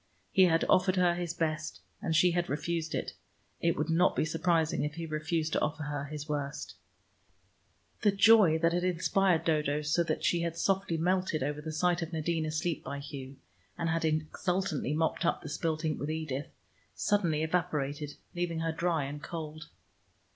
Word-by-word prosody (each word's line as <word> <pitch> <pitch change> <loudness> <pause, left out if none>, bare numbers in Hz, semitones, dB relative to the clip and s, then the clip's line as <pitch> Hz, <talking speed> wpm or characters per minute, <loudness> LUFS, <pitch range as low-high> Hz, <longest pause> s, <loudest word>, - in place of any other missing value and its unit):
He 190 - +6
had 165 -2 +3
offered 185 0 +4
her 180 -2 +4
his 175 -1 -3
best, 155 -1 -2 0.2
and 160 - -1
she 180 +2 +5
had 175 0 -1
refused 160 +2 -2
it; - - -3 0.5
it 170 0 +1
would 155 +2 -1
not 175 +3 +3
be - - +1
surprising 165 0 +1
if 150 +1 -3
he 165 0 -4
refused 160 0 -2
to - - +1
offer 155 +1 -1
her 145 -1 -3
his 150 +1 -6
worst. 145 -1 -3 1.3
The 210 - +4
joy 200 -4 +6
that 165 +1 +2
had 175 0 0
inspired 180 -1 +2
Dodo 150 -2 +1
so 150 +3 +2
that - - -2
she 170 - +2
had 170 -1 -2
softly 195 -3 +1
melted 180 -3 +1
over 145 +2 -2
the 160 +1 -5
sight 175 +3 +1
of 165 0 -5
Nadine 160 0 -1
asleep 155 +1 -2
by 140 - -5
Hugh, 140 -1 -8 0.4
and 165 - -1
had 165 0 0
exultantly 155 -1 -1
mopped 160 0 0
up 170 - 0
the 155 - -6
spilt 160 +1 -2
ink 155 - -1
with 145 - -3
Edith, 155 -3 -3 0.5
suddenly 170 -7 +1
evaporated, 150 -4 -1 0.2
leaving 175 -2 -2
her 165 0 0
dry 165 -2 0
and 145 +2 -5
cold. 155 -2 -6
160 Hz, 180 wpm, -30 LUFS, 150-175 Hz, 1.3 s, He